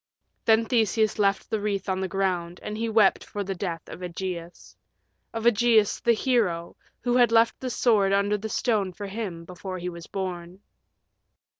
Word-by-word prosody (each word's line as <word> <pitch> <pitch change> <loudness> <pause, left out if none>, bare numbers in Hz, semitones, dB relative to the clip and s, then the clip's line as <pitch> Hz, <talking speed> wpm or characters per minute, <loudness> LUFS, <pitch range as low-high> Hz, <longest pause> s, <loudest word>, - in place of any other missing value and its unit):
Then 225 0 +4
Theseus 220 -2 +1
left 200 -1 +2
the 220 - +1
wreath 200 -2 -2
on 190 0 -1
the 190 - -1
ground, 180 -3 -1
and 210 - -4
he 225 +1 -2
wept 215 -3 +4
for 205 - -5
the 195 0 -3
death 175 -4 -4
of - - -9
Ægeus 175 -1 -6 0.6
of 225 -1 -4
Ægeus, 230 -2 +3
the 235 - +4
hero, 215 -9 0 0.3
who 245 0 0
had 245 -2 +5
left 230 0 +4
the 260 - -3
sword 215 -5 +3
under 200 +1 +2
the 220 +2 -5
stone 205 -5 0
for 200 +3 -7
him 195 -5 -5
before 185 +1 -7
he 180 0 -4
was 170 -1 -9
born. 185 -1 -5
200 Hz, 175 wpm, -26 LUFS, 180-225 Hz, 0.6 s, had